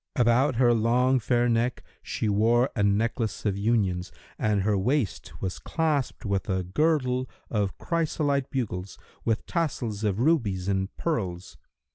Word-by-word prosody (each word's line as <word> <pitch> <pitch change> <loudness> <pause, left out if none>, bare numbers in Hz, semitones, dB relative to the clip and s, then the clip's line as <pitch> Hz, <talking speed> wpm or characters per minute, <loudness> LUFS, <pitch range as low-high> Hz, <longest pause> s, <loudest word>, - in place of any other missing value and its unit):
About 125 +2 +3
her 120 0 +4
long 125 +3 +3
fair 120 +1 +1
neck 120 +1 0 0.2
she 110 - -3
wore 115 +5 +3
a 105 - 0
necklace 110 +2 0
of 100 -2 +1
unions 100 -4 0 0.3
and 105 -2 +1
her 105 +1 +2
waist 115 +2 -1
was 95 -1 -3
clasped 150 -7 -1
with 100 +1 -1
a 95 -1 0
girdle 130 - +1 0.2
of 100 -4 -1
chrysolite 150 -5 0
bugles, 100 -8 -3 0.3
with 115 -1 0
tassels 125 - -2
of 105 -1 0
rubies 115 - +1
and 95 -1 0
pearls. 95 - -3
115 Hz, 140 wpm, -27 LUFS, 100-130 Hz, 0.3 s, her